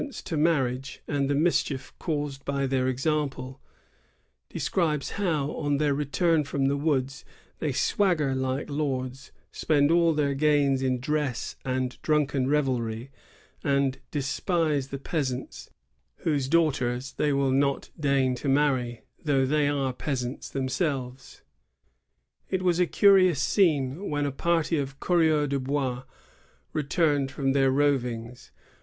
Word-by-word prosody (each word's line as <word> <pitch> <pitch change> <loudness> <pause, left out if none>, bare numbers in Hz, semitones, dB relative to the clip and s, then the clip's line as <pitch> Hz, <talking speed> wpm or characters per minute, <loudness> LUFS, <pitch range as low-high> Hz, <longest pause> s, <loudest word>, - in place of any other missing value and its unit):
ence 285 -4 -6
to 170 - -4
marriage, 135 -4 0
and 140 -1 0
the 145 - +2
mischief 150 -3 0
caused 145 -4 -3
by 140 0 -1
their 130 -1 0
example; 135 -1 -2 0.9
describes 155 -6 -1
how, 160 -8 -1
on 145 -1 -1
their 145 -1 +2
return 150 +3 +1
from 140 -1 -1
the 140 +1 +2
woods, 140 -2 -1 0.4
they 150 - -1
swagger 165 - +1
like 130 +1 -2
lords, 135 -3 -3 0.2
spend 145 -1 +2
all 170 0 +4
their 150 -2 +1
gains 140 -2 +2
in 130 -1 0
dress 145 -2 -2
and 130 -1 -2
drunken 145 -4 +1
revelry, 125 -4 -1 0.5
and 140 -1 +1
despise 150 0 0
the 140 - -5
peas 140 -1 -2
ants, 125 +1 -7 0.6
whose 145 -5 +1
daughters 135 -5 +1
they 150 - 0
will 140 -1 +1
not 140 +1 0
deign 140 -3 +2
to 125 +3 -3
marry, 130 -5 +1 0.2
though 140 -4 +2
they 145 +2 +2
are 140 -3 0
peasants 125 -1 -4
themselves. 130 -2 -3 1.1
It 190 -1 -1
was 175 -1 +2
a 180 - +3
curious 185 -7 +5
scene 155 0 +1
when 145 -1 0
a 140 - -1
party 165 +2 0
of 135 -1 -5
coureurs 160 -4 +2
de 140 0 0
hois 130 -1 -2 0.7
returned 145 -2 +1
from 135 0 -1
their 135 -1 +3
rovings. 125 -4 -1
140 Hz, 135 wpm, -27 LUFS, 130-150 Hz, 1.1 s, curious